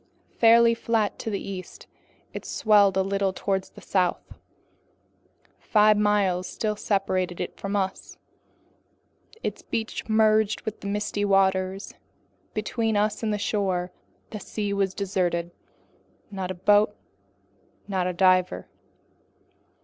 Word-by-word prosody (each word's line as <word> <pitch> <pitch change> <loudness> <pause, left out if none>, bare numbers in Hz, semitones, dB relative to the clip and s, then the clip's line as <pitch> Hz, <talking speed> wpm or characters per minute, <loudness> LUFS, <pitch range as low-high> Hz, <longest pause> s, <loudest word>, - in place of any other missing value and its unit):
Fairly 230 0 +6
flat 230 -2 -1
to - - -4
the 200 -2 -2
east, 185 -2 -8 0.5
it - - -6
swelled 205 -3 +3
a 190 - +3
little 195 0 0
toward 190 0 -2
the - - -15
south. 185 -2 -1 1.3
Five 215 0 +4
miles 205 -3 +1
still 215 -1 -2
separated 185 -4 -1
it - - -4
from 200 +1 -3
us, 190 -1 -3 1.2
and 450 - -25
its - - -3
beach 225 0 -4
merged 215 -1 +3
with 220 - -6
the 200 - -7
misty 205 0 -2
waters. 190 -1 +1 0.6
Between 220 0 -1
us 210 +1 0
and 220 -2 -1
the 210 - 0
shore, 190 -4 -1 0.4
the 215 - -5
sea 205 0 -3
was 195 -1 0
deserted. 180 -3 -1 0.8
Not 190 -2 -4
a 185 - -4
boat, 205 +4 +3 0.9
not 190 -3 -1
a 180 - -2
diver. 185 0 +2
200 Hz, 125 wpm, -25 LUFS, 190-215 Hz, 1.3 s, Fairly